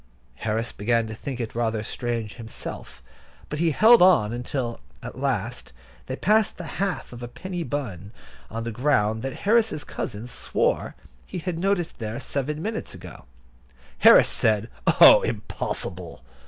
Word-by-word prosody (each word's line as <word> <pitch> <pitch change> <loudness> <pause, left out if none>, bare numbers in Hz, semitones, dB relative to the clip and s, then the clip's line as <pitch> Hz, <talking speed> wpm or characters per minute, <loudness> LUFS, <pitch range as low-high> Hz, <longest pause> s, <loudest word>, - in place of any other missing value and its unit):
Harris 110 +2 -2
began 115 +3 0
to 110 - -6
think 125 +3 -6
it 115 -2 -4
rather 115 -2 -1
strange 115 -2 -3
himself, 115 -2 -8 0.5
but 150 - -4
he 170 0 +3
held 220 - +6
on 165 - +5
until, 120 0 -3 0.2
at - - -8
last, - - -2 0.3
they - - -3
passed 215 +2 +2
the 180 - -6 0.2
half 195 -9 -2
of 120 - -9
a 120 - -5
penny 180 +7 -6
bun 110 - -4 0.4
on 115 +1 -4
the 115 - -4
ground 110 -3 +1
that 135 +1 -5
Harris's 220 -7 +2
cousin 110 -3 -5
swore 125 - -1 0.3
he - - -6
had 170 -1 -3
noticed 190 -2 -1
there 110 +1 -4
seven 145 +3 -3
minutes 220 +1 -4
ago. - - -11 0.7
Harris - - +8
said: 110 0 +1 0.3
"Oh, - - +10
impossible!" - - -4
120 Hz, 150 wpm, -25 LUFS, 110-170 Hz, 0.7 s, Oh